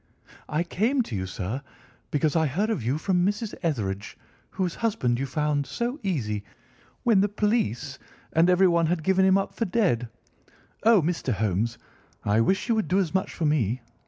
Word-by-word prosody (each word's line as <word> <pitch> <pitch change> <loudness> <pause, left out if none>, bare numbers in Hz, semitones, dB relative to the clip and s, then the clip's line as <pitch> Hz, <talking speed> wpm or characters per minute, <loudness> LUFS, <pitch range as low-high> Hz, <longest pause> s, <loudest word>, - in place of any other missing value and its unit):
"I 155 +3 0
came 230 +9 +1
to 115 - -6
you, 95 -1 -2
sir, 100 +8 -4 0.5
because 150 +1 +1
I 160 -1 +3
heard 200 - 0
of 220 - -1
you 125 +6 0
from 180 +2 +1
Mrs. 205 +3 -1
Etherege, 105 - -2 0.3
whose 180 -3 -2
husband 165 - 0
you 135 - -2
found 145 0 0
so 240 - -3
easy 110 - -2 0.6
when 225 -6 +4
the 205 - +2
police 205 - -1 0.3
and 165 +2 +4
everyone 175 -2 +4
had 165 -1 -1
given 190 +1 +3
him 190 0 +5
up 195 - -2
for 230 - -1
dead. 175 - +1 0.7
Oh, 220 -5 +5
Mr. 165 -6 -1
Holmes, 110 +3 -1 0.5
I 105 +2 +3
wish 190 - +1
you 235 - +3
would 220 -2 0
do 185 - +2
as 185 -4 0
much 190 0 0
for 165 - -1
me. 130 -5 +1
165 Hz, 180 wpm, -26 LUFS, 125-195 Hz, 0.7 s, him